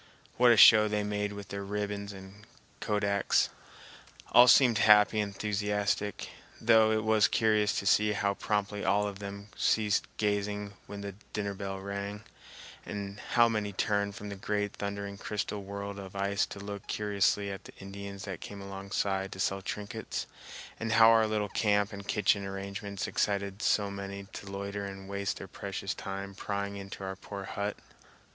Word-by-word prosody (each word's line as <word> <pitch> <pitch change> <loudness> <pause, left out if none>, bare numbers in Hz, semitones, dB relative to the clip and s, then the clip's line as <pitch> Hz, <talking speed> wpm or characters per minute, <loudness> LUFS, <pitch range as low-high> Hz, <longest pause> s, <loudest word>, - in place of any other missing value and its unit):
What 125 0 +6
a 115 - +5
show 110 0 +9
they 105 0 0
made 105 0 -2
with 100 -1 -8
their 100 0 -4
ribbons 100 0 -3
and 95 +1 -12 0.3
kodaks! 100 -1 +1 0.8
All 120 +1 +8
seemed 120 -2 +6
happy 105 -1 +6
and 105 -1 -1
enthusiastic, 105 0 -1 0.3
though 110 -1 +5
it 110 0 +1
was 110 -1 +4
curious 105 -2 +2
to - - -2
see 105 +1 +4
how 100 0 +1
promptly 105 0 -2
all 100 +1 +2
of 100 -1 -6
them 100 0 -7
ceased 105 -2 +2
gazing 105 -1 -1
when 100 0 -7
the 100 0 -5 0.2
dinner 100 -1 -2
bell 95 0 -5
rang, 100 +1 -5 0.6
and 100 0 -6
how 120 +2 +3
many 105 -3 -1
turned 100 +1 0
from 105 0 -7
the 100 - -5
great 105 +1 -2
thundering 100 0 -5
crystal 105 -1 -3
world 100 0 -6
of 95 -1 -9
ice 100 +1 0
to 100 - -8
look 100 0 -7
curiously 100 -1 +1
at 95 - -8
the - - -12
Indians 100 0 -8
that 95 -4 -6
came 100 - -8
alongside 95 0 -2
to 95 - -10
sell 95 +1 0
trinkets, 105 +3 -4 0.5
and 115 0 -1
how 115 0 +8
our 110 -1 +5
little 105 -1 -1
camp 105 0 +1
and 100 0 -8
kitchen 105 -1 +2
arrangements 100 +1 -5
excited 100 0 -1
so 100 -1 +2
many 100 0 -6
to 100 - -8
loiter 100 +1 -4
and 95 -1 -7
waste 100 0 -2
their - - -8
precious - - -4
time 100 0 -6
prying 100 0 -3
into 100 0 -8
our 95 0 -4
poor 100 +1 -7
hut. 100 +1 -3
100 Hz, 170 wpm, -30 LUFS, 100-105 Hz, 0.8 s, show